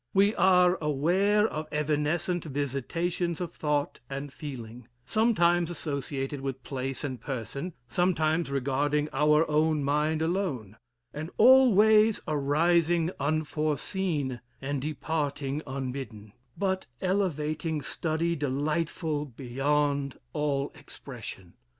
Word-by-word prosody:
We 200 +2 +5
are 180 -2 +4
aware 180 +9 +2
of 155 -4 -5
evanescent 155 +4 0
visitations 155 +5 -2
of 175 -2 -4
thought 150 -1 -1
and 140 0 -5
feeling, 125 -5 -8 0.2
sometimes 175 - +3
associated 140 -3 -3
with 135 -1 -4
place 135 -1 -4
and 130 -4 -4
person, 140 - -5
sometimes 160 +2 +1
regarding 140 +2 0
our 150 +2 +4
own 155 0 +2
mind 150 +3 +1
alone, 160 - -2 0.4
and 155 +2 -5
always 220 -3 +6
arising 165 +3 +2
unforeseen, 150 -1 -1 0.2
and 135 0 -3
departing 145 -1 -2
unbidden, 130 -6 -5 0.2
but 190 -1 -1
elevating 160 -5 -1 0.2
and 165 0 0
delightful 150 +2 -1
beyond 140 +2 -1 0.2
all 145 -2 -1
expression. 110 -9 -10
150 Hz, 100 wpm, -28 LUFS, 140-170 Hz, 0.4 s, always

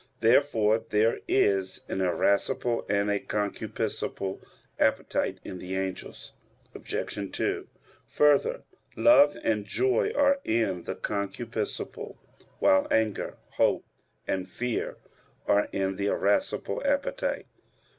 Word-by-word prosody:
Therefore 115 -2 +4
there 110 +2 +2
is 95 -6 +2
an 95 - -2
irascible 100 +6 +1
and 100 0 +2
a 100 - +1
concupiscible 100 -1 -3 0.4
appetite - - +1
in 90 - -7
the 90 +1 -5
angels. 95 -1 -5 0.4
Obj. 100 -1 -4
2: - - -2 0.4
Further, 150 - +3 0.3
love 145 - +6
and 105 -2 +1
joy 120 +4 +1
are 280 -1 +4
in 105 -6 0
the - - -3
concupiscible; 105 +2 -4 0.4
while 95 - +4
anger, 110 -2 0 0.2
hope, - - +2 0.4
and 95 -1 -2
fear 120 +5 -3 0.5
are 100 0 +3
in 95 0 -1
the 100 - -1
irascible 285 - 0
appetite. - - -1
105 Hz, 105 wpm, -28 LUFS, 95-125 Hz, 0.5 s, love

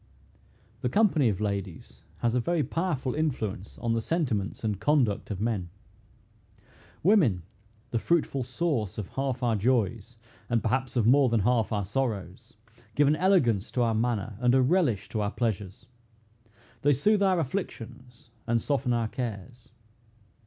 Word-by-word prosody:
The 125 - 0
company 160 - +3
of 100 -3 -2
ladies 100 -4 -4 0.2
has 120 -1 +1
a 125 - +2
very 165 +5 0
powerful 150 -8 -2
influence 115 - -3
on 115 -1 -1
the 115 - 0
sentiments 120 - -2
and 105 -3 -1
conduct 125 -5 +1
of 100 -4 -4
men. 105 -5 -1 1.3
Women, 150 - +4 0.5
the 115 - 0
fruitful 150 -2 0
source 125 - -2
of 105 -4 -5
half 135 -2 -3
our 115 -2 +2
joys, 115 0 0 0.3
and 120 -2 +1
perhaps 130 +3 -1
of 120 -4 +2
more 130 +2 +5
than 115 -2 +2
half 115 +2 +1
our 105 -3 -1
sorrows, 105 -2 -3 0.4
give 145 -1 +4
an 150 - +4
elegance 150 - +2
to 125 - +2
our 115 -1 +1
manner, 110 -2 -1
and 125 +1 +3
a 130 - +5
relish 125 - +1
to 110 - -2
our 100 - 0
pleasures. 105 -3 -3 1.0
They 145 +1 +4
soothe 205 - +2
our 190 -3 +3
afflictions, 125 - -6 0.2
and 115 0 +2
soften 135 0 0
our 115 -1 0
cares. 120 +1 -6
120 Hz, 150 wpm, -27 LUFS, 110-140 Hz, 1.3 s, more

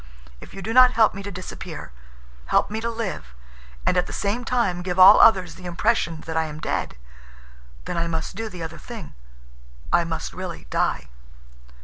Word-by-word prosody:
If - - -13
you 195 - -8
do 225 - -3
not 255 0 +7
help 225 -1 +4
me 200 - -7
to 200 - -6
disappear, 185 - -8 0.6
help - - +2
me 220 +1 -3
to 230 - -2
live—and 65 - -5
at 180 - +1
the - - -8
same 210 +5 -2
time 230 -8 0
give 180 0 -3
all 190 +3 +9
others 185 -6 +5
the 185 - -13
impression 175 -3 0
that 160 - -6
I 160 0 +1
am 155 -1 -7
dead—then - - -7
I 170 0 0
must 160 +2 -4
do 225 +1 -4
the 180 -4 -8
other 165 0 -7
thing. 230 - -9 0.8
I 175 - +5
must 165 -1 -5
really 185 -2 -7
die." - - -1
175 Hz, 180 wpm, -23 LUFS, -, 0.8 s, all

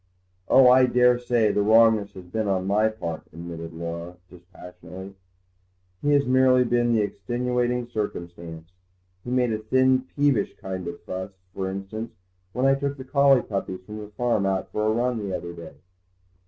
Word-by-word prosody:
"Oh, 130 -1 +7
I 130 +1 +6
daresay 125 -3 +3
the 105 - +1
wrongness 110 -1 +4
has 95 - -10
been 105 +4 -3
on 95 -1 0
my 105 +3 +2
part," 85 -7 -5
admitted 85 0 -8
Laura 85 +1 -6
dispassionately; 90 +1 -12 0.9
"he 145 - 0
has 140 -1 +3
merely 130 0 +4
been 120 -1 +1
the 110 -2 +3
extenuating 120 +4 -1
circumstance. 85 -7 -6 0.5
He - - -7
made 125 -2 +1
a 110 - -2
thin, 130 +3 +2
peevish 140 -8 +1
kind 95 -1 -6
of - - -7
fuss, 95 +1 -6 0.2
for 95 -1 -3
instance, 100 +4 -6 0.4
when 125 +5 -1
I 135 - +5
took 140 +1 -2
the 130 - -7
collie 140 -2 +4
puppies 95 -2 -4
from 105 +1 -8
the 105 - -8
farm 110 0 0
out 95 -1 -2
for 105 0 -1
a - - +3
run 120 +1 0
the 100 -3 -3
other 85 0 -8
day." 85 -3 -11
110 Hz, 170 wpm, -24 LUFS, 95-125 Hz, 0.9 s, Oh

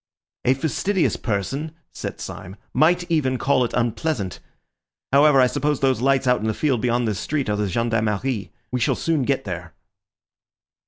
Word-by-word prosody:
"A 130 - +4
fastidious 165 +6 0
person," 135 - -3 0.2
said - - -6
Syme, 95 - -7 0.2
"might 175 +3 +3
even 130 -5 +1
call 135 0 +2
it 120 - -3
unpleasant. 120 - -1 0.7
However, 140 0 +6
I 130 - +7
suppose 145 +2 0
those 130 -4 +1
lights 135 0 +2
out 125 -2 +3
in 110 - -1
the 110 - 0
field 135 -7 +1
beyond 120 -1 +1
this 105 -3 -1
street 145 -3 -2
are - - +1
the 105 0 -1
Gendarmerie. 115 +1 -1 0.2
We 125 - -1
shall 115 - +2
soon 165 -3 0
get 135 0 0
there." 85 -3 -6
130 Hz, 165 wpm, -22 LUFS, 110-145 Hz, 0.7 s, I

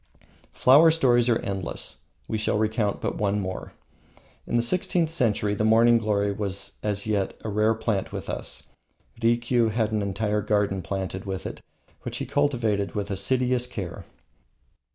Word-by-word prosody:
Flower 145 +6 +6
stories 125 -7 +3
are 115 - +4
endless. 95 -5 -4 0.3
We 110 - -2
shall 105 - 0
recount 110 -1 0
but - - -3
one 105 0 +1
more. 95 -2 -5 0.7
In - - -2
the 120 - +3
sixteenth 170 +3 +1
century 105 -8 +1
the 105 - -1
morning 115 +2 +5
glory 100 -2 0
was 100 -1 -4
as 100 -2 -1
yet 105 -3 -1
a 110 - -4
rare 105 +2 +2
plant 110 -3 -2
with - - -6
us. - - -4 0.5
Rikiu 120 0 +2
had 110 0 0
an 105 -1 0
entire 105 +1 -1
garden 105 -2 0
planted 95 +1 -4
with 95 -1 -4
it, - - -6 0.4
which - - -5
he - - -3
cultivated 120 -9 0
with 105 0 -3
assiduous 125 +5 +1
care. 95 -8 -6
105 Hz, 155 wpm, -25 LUFS, 100-120 Hz, 0.7 s, Flower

